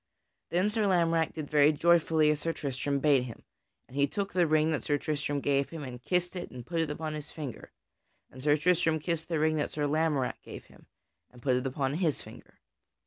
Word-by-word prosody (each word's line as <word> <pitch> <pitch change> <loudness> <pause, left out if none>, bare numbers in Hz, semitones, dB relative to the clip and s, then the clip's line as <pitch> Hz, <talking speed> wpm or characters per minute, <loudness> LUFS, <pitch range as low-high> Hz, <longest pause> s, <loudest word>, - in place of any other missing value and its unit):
Then 185 +5 +1
Sir 215 -2 +1
Lamorack 165 -3 +2
did 155 -2 -5
very 150 0 +5
joyfully 160 -1 +3
as 150 - -1
Sir 165 +1 -2
Tristram 140 0 -2
bade 140 -3 +3
him, 120 - -10 0.4
and 130 - -14
he 140 0 +3
took 200 +7 -3
the 175 -2 +3
ring 155 +1 +3
that 150 -6 -1
Sir 145 +4 0
Tristram 145 -1 -2
gave 140 0 +1
him 165 -3 -7
and 125 -2 -8
kissed 180 +5 -1
it 180 - -5
and 125 -2 -9
put 170 +3 -2
it 160 -2 0
upon 155 +1 -4
his 150 -1 -6
finger; 145 -6 -8 0.6
and 130 - -11
Sir 145 +2 +3
Tristram 165 0 +2
kissed 165 +1 -3
the 165 - -1
ring 155 +1 +2
that 150 - -1
Sir 150 -1 -2
Lamorack 150 -3 0
gave - - -10
him - - -20 0.4
and 125 - -17
put 130 0 +1
it 125 +1 -1
upon 135 0 -1
his 160 -2 0
finger. - - -14
155 Hz, 215 wpm, -29 LUFS, 140-165 Hz, 0.6 s, very